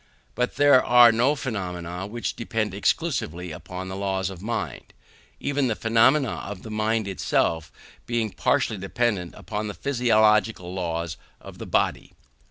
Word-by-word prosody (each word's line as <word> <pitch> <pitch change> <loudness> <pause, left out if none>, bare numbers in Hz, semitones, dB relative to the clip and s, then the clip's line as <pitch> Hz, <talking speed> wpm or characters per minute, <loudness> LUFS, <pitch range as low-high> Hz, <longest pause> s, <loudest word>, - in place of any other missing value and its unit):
But 125 0 -1
there 145 -2 +6
are 120 -1 +7
no 125 +6 +2
phenomena 90 - -4
which 115 +3 -4
depend 110 -4 -2
exclusively 95 - -1
upon 90 +4 -7
the 95 - -5
laws 95 -1 -1
of 90 -2 -10
mind; 115 +3 -4 0.4
even 145 -1 0
the 115 - 0
phenomena 120 +5 +3
of 100 -2 -7
the 110 - -8
mind 110 0 0
itself 80 -3 0 0.4
being 115 -3 -1
partially 105 +2 0
dependent 95 -2 -1
upon 105 +3 -4
the 105 - -6
physiological 110 -7 +2
laws 85 -2 -3 0.2
of - - -12
the - - -7
body. - - 0
105 Hz, 145 wpm, -25 LUFS, 95-120 Hz, 0.4 s, are